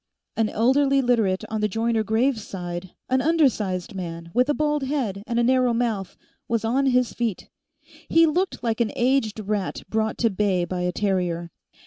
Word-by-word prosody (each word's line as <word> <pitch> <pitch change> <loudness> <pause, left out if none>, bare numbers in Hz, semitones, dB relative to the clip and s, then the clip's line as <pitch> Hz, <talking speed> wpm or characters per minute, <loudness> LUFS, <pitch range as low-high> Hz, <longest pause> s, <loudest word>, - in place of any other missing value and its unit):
An 225 -1 +1
elderly 270 +4 +3
Literate 225 -7 +1
on 220 -1 -3
the 210 - +2
Joyner 225 +2 0
Graves 225 +2 +1
side, 175 -1 -6
an 260 0 +2
undersized 235 - +1
man 170 -3 -6
with 250 +3 +2
a - - +4
bald 300 -1 0
head 250 -9 -2
and 235 - -1
a 240 - +3
narrow 255 0 +3
mouth, 225 -5 -2 0.3
was 230 -1 -1
on 265 +4 +2
his 250 -2 +2
feet. 230 -6 -3 0.6
He 330 0 +6
looked 355 +4 -1
like 230 0 0
an 225 - +1
aged 240 -4 +1
rat 205 -2 -3
brought 220 +1 -1
to 230 -2 +2
bay 190 -3 +1
by 180 0 -3
a 180 0 0
terrier. 180 -4 -1
225 Hz, 175 wpm, -24 LUFS, 195-255 Hz, 0.6 s, He